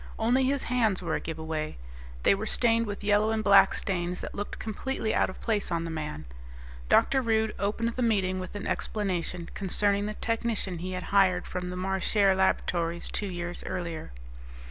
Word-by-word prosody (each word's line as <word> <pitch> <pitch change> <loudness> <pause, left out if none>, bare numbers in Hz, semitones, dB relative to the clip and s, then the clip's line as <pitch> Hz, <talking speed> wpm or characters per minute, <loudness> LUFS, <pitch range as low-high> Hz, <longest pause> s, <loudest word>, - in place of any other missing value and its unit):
Only 245 +4 +3
his 275 +1 +1
hands 225 -7 +1
were 170 - -2
a - - +1
giveaway; 160 - -4 0.5
they - - +6
were 205 +3 -3
stained 230 -1 +2
with 205 0 -5
yellow 205 +1 +3
and 220 -1 0
black 200 -1 +6
stains 180 -2 -2
that - - -6
looked 205 0 -5
completely 220 +1 -2
out - - +2
of 185 - -9
place 210 -5 0
on 170 -1 0
the 165 - -4
man. 150 - -5 0.6
Dr. 270 - +4
Rude 220 -2 +1
opened 215 +3 0
the 240 +2 -4
meeting 190 -5 +1
with 185 +2 -7
an 205 - -5
explanation 180 -4 -2
concerning 200 +1 +1
the 215 - -4
technician 225 -6 -2
he 185 +2 -4
had 185 0 -3
hired 185 -3 +4
from 180 -1 -4
the 180 - -5
Marchare 190 +2 +2
Laboratories 170 -2 0
two 205 - -1
years 175 -1 -5
earlier. 170 - -4
195 Hz, 180 wpm, -28 LUFS, 180-220 Hz, 0.6 s, they